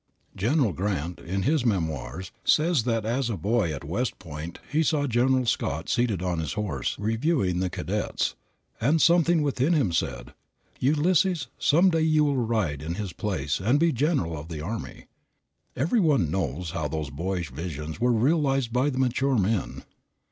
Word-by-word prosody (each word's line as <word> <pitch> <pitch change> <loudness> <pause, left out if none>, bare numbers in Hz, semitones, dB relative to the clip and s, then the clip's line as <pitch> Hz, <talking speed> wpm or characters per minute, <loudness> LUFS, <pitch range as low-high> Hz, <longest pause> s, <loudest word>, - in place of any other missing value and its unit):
General 120 - +1
Grant, 90 -2 -2
in 95 +2 -3
his 150 +3 +2
"Memoirs," 90 - -2
says 155 -6 +3
that 115 -3 0
as 120 +2 0
a 110 - -2
boy 100 0 +1
at 70 - -6
West 100 - -2
Point, 80 -1 -8
he 155 +2 +2
saw 150 -2 +1
General 130 +1 +2
Scott 80 -7 -1
seated 115 -7 +1
on 90 -2 -1
his 80 - -3
horse, 95 - -2
reviewing 110 - 0
the 95 0 0
cadets, - - -2 0.5
and 145 +8 +3
something 170 -1 +4
within 140 +3 +1
him 135 - +2
said, - - -2 0.5
"Ulysses, 165 +5 +2
some 175 +5 +4
day 165 -1 +1
you 155 -1 +3
will 145 -2 +1
ride 105 -11 -1
in 80 +3 -4
his 100 -2 -4
place 75 -9 -2
and 120 +9 +2
be 165 +1 +3
general 130 - 0
of 75 +1 -7
the 80 -2 -6
army." 105 +9 -6 0.7
Every 165 - +1
one 140 - +2
knows 85 -1 -2
how 80 -4 -2
those 75 -1 -4
boyish 85 0 -3
visions 75 +1 -6
were 125 0 +3
realized 135 0 +2
by 130 +3 +2
the 130 - -4
mature 130 +1 +1
men. 105 0 -1
110 Hz, 170 wpm, -26 LUFS, 85-140 Hz, 0.7 s, something